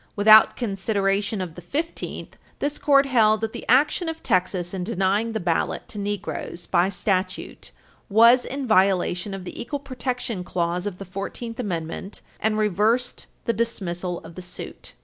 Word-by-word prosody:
Without 215 Hz, +1 st, +7 dB
consideration 200 Hz, -2 st, 0 dB
of 175 Hz, -3 st, -5 dB
the 175 Hz, -, -10 dB
Fifteenth, 315 Hz, -, -4 dB, 0.2 s
this 290 Hz, +1 st, -2 dB
Court 280 Hz, -1 st, +5 dB
held 220 Hz, -5 st, +3 dB
that 225 Hz, 0 st, -2 dB
the -, -, -8 dB
action 300 Hz, +6 st, +3 dB
of 325 Hz, 0 st, -6 dB
Texas 180 Hz, -1 st, 0 dB
in 185 Hz, -2 st, -3 dB
denying 205 Hz, +2 st, 0 dB
the 220 Hz, -, -1 dB
ballot 170 Hz, -3 st, -1 dB
to 210 Hz, -, -6 dB
Negroes 200 Hz, -3 st, -4 dB
by 180 Hz, +1 st, +2 dB
statute 185 Hz, 0 st, -2 dB, 0.4 s
was 235 Hz, +4 st, +6 dB
in 275 Hz, 0 st, -4 dB
violation 190 Hz, -2 st, +2 dB
of 190 Hz, -, -7 dB
the 180 Hz, -, -7 dB
equal 285 Hz, +5 st, -3 dB
protection 250 Hz, -7 st, -4 dB
clause 175 Hz, +1 st, -1 dB
of 190 Hz, -3 st, -5 dB
the 195 Hz, -, -8 dB
Fourteenth 210 Hz, +5 st, -6 dB
Amendment, 180 Hz, -2 st, -4 dB, 0.2 s
and 215 Hz, 0 st, +1 dB
reversed 215 Hz, +4 st, +1 dB, 0.2 s
the 230 Hz, -, +1 dB
dismissal 180 Hz, -6 st, -2 dB
of 165 Hz, +1 st, -11 dB
the 185 Hz, -, -8 dB
suit. 180 Hz, 0 st, -9 dB
205 Hz, 160 wpm, -24 LUFS, 185-235 Hz, 0.4 s, Without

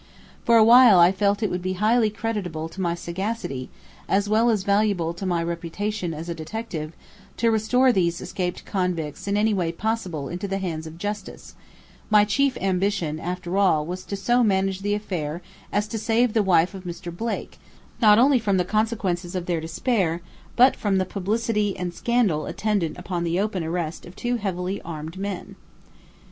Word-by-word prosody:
For 230 Hz, -1 st, +6 dB
while 235 Hz, -2 st, +8 dB
I 175 Hz, +1 st, +7 dB
felt 200 Hz, +2 st, +1 dB
it 210 Hz, -, 0 dB
would 180 Hz, -, -2 dB
be 185 Hz, +1 st, -2 dB
highly 215 Hz, +4 st, +3 dB
creditable 205 Hz, -8 st, -3 dB
to 190 Hz, +3 st, -7 dB
my 170 Hz, -2 st, 0 dB
sagacity, 175 Hz, -, -4 dB, 0.4 s
as 200 Hz, +1 st, +2 dB
well 220 Hz, +3 st, +3 dB
as 215 Hz, -4 st, +1 dB
valuable 200 Hz, -4 st, +1 dB
to 185 Hz, +3 st, -5 dB
my 170 Hz, -2 st, 0 dB
reputation 170 Hz, +3 st, -3 dB
as 160 Hz, +1 st, -6 dB
a 170 Hz, -, -2 dB
detective, 165 Hz, -2 st, -5 dB, 0.4 s
to 230 Hz, 0 st, +2 dB
restore 250 Hz, +4 st, +3 dB
these 170 Hz, -5 st, +1 dB
escaped 180 Hz, -2 st, -4 dB
convicts 180 Hz, -5 st, -2 dB
in 200 Hz, +1 st, +1 dB
any 215 Hz, +1 st, +2 dB
way 175 Hz, -4 st, 0 dB
possible 180 Hz, -6 st, -3 dB
into 180 Hz, +5 st, -4 dB
the 195 Hz, 0 st, -2 dB
hands 165 Hz, -4 st, -4 dB
of 160 Hz, +1 st, -10 dB
justice, 205 Hz, +2 st, -6 dB, 0.6 s
my 210 Hz, -1 st, +6 dB
chief 270 Hz, +6 st, +1 dB
ambition 185 Hz, -4 st, 0 dB
after 180 Hz, +2 st, -3 dB
all 160 Hz, -6 st, +3 dB
was 180 Hz, +3 st, -5 dB
to 200 Hz, -, -4 dB
so 240 Hz, +6 st, +2 dB
manage 195 Hz, -2 st, +1 dB
the 205 Hz, +1 st, 0 dB
affair 175 Hz, -5 st, -4 dB, 0.3 s
as 205 Hz, +1 st, 0 dB
to 225 Hz, -, -3 dB
save 230 Hz, +1 st, +2 dB
the 225 Hz, -, +3 dB
wife 180 Hz, -2 st, +3 dB
of 190 Hz, -1 st, -8 dB
Mr. 175 Hz, -1 st, -7 dB
Blake, 230 Hz, +5 st, -4 dB, 0.4 s
not 210 Hz, -2 st, +7 dB
only 260 Hz, +2 st, +5 dB
from 205 Hz, -4 st, +1 dB
the 180 Hz, -, +1 dB
consequences 195 Hz, -4 st, -1 dB
of 180 Hz, -1 st, -2 dB
their 170 Hz, -2 st, -1 dB
despair, 170 Hz, 0 st, 0 dB, 0.3 s
but 255 Hz, +2 st, +6 dB
from 200 Hz, -2 st, 0 dB
the 185 Hz, -, +1 dB
publicity 210 Hz, +1 st, -1 dB
and 180 Hz, -1 st, -3 dB
scandal 210 Hz, -10 st, +1 dB
attendant 200 Hz, -7 st, -1 dB
upon 180 Hz, -1 st, -3 dB
the 170 Hz, +1 st, 0 dB
open 195 Hz, -4 st, -1 dB
arrest 165 Hz, 0 st, -3 dB
of 175 Hz, -, -13 dB
two 240 Hz, 0 st, -1 dB
heavily 190 Hz, -2 st, -3 dB
armed 165 Hz, +2 st, -7 dB
men. 195 Hz, -2 st, -5 dB
190 Hz, 180 wpm, -24 LUFS, 170-215 Hz, 0.6 s, while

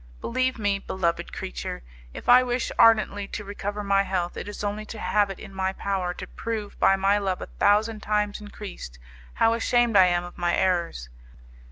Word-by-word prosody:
Believe 255 Hz, +1 st, -1 dB
me, 205 Hz, -2 st, 0 dB
beloved 175 Hz, -3 st, -2 dB
creature, -, -, -6 dB, 0.3 s
if -, -, -10 dB
I 245 Hz, +1 st, +8 dB
wish 245 Hz, -1 st, -1 dB
ardently 215 Hz, -3 st, +4 dB
to 210 Hz, -, -6 dB
recover 205 Hz, +1 st, -5 dB
my 200 Hz, 0 st, +3 dB
health, 185 Hz, -3 st, -2 dB
it -, -, -6 dB
is 205 Hz, -, -7 dB
only 205 Hz, +1 st, -2 dB
to 225 Hz, -, -8 dB
have 210 Hz, -1 st, +1 dB
it 195 Hz, -, -6 dB
in 195 Hz, -, -11 dB
my 190 Hz, 0 st, -1 dB
power 190 Hz, -3 st, -2 dB
to -, -, -7 dB
prove 220 Hz, -3 st, -5 dB
by 195 Hz, -, +5 dB
my 195 Hz, +2 st, +2 dB
love 190 Hz, -2 st, -1 dB
a -, -, -5 dB
thousand 215 Hz, +2 st, +2 dB
times 210 Hz, -1 st, -1 dB
increased, 205 Hz, -, -9 dB, 0.4 s
how 225 Hz, -, +3 dB
ashamed 235 Hz, 0 st, +2 dB
I 190 Hz, -2 st, +7 dB
am 175 Hz, 0 st, +1 dB
of 175 Hz, 0 st, -10 dB
my 175 Hz, 0 st, +1 dB
errors. 170 Hz, -, 0 dB
200 Hz, 190 wpm, -25 LUFS, 190-215 Hz, 0.4 s, I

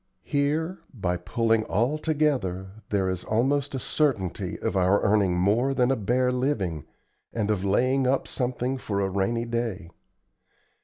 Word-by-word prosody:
Here, 155 Hz, +5 st, 0 dB
by 95 Hz, -8 st, -1 dB
pulling 110 Hz, +5 st, +1 dB
all 120 Hz, -, 0 dB
together, 110 Hz, -, -1 dB
there 100 Hz, -2 st, +1 dB
is 95 Hz, -1 st, -2 dB
almost 135 Hz, +5 st, 0 dB
a -, -, -2 dB
certainty 105 Hz, -, -1 dB
of 110 Hz, -, -2 dB
our 95 Hz, +2 st, +4 dB
earning 100 Hz, -4 st, +3 dB
more 115 Hz, +9 st, +2 dB
than 125 Hz, 0 st, +3 dB
a -, -, +3 dB
bare 125 Hz, +3 st, +1 dB
living, 110 Hz, -, -1 dB, 0.5 s
and 110 Hz, -2 st, -1 dB
of 100 Hz, -3 st, -1 dB
laying 130 Hz, +7 st, +2 dB
up 135 Hz, +1 st, +1 dB
something 125 Hz, +1 st, -2 dB
for 100 Hz, -5 st, -2 dB
a 100 Hz, -, +1 dB
rainy 110 Hz, +5 st, 0 dB
day. 115 Hz, -7 st, -3 dB
115 Hz, 150 wpm, -26 LUFS, 95-130 Hz, 0.5 s, our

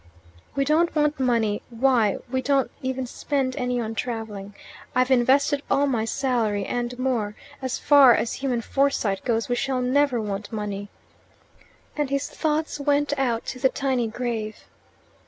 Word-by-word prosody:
"We 275 Hz, 0 st, +1 dB
don't 320 Hz, +4 st, +2 dB
want 300 Hz, -1 st, +1 dB
money 230 Hz, -5 st, +1 dB
why, 235 Hz, -4 st, +2 dB
we 260 Hz, 0 st, 0 dB
don't 270 Hz, 0 st, +1 dB
even 260 Hz, 0 st, -2 dB
spend 260 Hz, +1 st, -2 dB
any 250 Hz, -3 st, -1 dB
on 225 Hz, -1 st, -3 dB
travelling. 215 Hz, -4 st, -5 dB, 0.4 s
I've 255 Hz, +1 st, +2 dB
invested 270 Hz, +3 st, +3 dB
all 280 Hz, -, +3 dB
my 240 Hz, -5 st, 0 dB
salary 225 Hz, -4 st, 0 dB
and 245 Hz, 0 st, -3 dB
more. 240 Hz, -5 st, -1 dB, 0.3 s
As 260 Hz, -1 st, -2 dB
far 280 Hz, -4 st, +7 dB
as 230 Hz, -, -1 dB
human 250 Hz, -4 st, 0 dB
foresight 235 Hz, -7 st, 0 dB
goes, 230 Hz, -2 st, 0 dB
we 245 Hz, -, 0 dB
shall 260 Hz, +1 st, 0 dB
never 255 Hz, 0 st, +2 dB
want 205 Hz, -1 st, -4 dB
money." 205 Hz, -2 st, -4 dB, 1.1 s
And 295 Hz, -2 st, -1 dB
his 275 Hz, 0 st, -1 dB
thoughts 310 Hz, -1 st, -1 dB
went 290 Hz, 0 st, +1 dB
out 235 Hz, -4 st, 0 dB
to 255 Hz, -, -5 dB
the 265 Hz, 0 st, +4 dB
tiny 260 Hz, -4 st, 0 dB
grave. 220 Hz, -2 st, -4 dB
250 Hz, 155 wpm, -24 LUFS, 225-275 Hz, 1.1 s, far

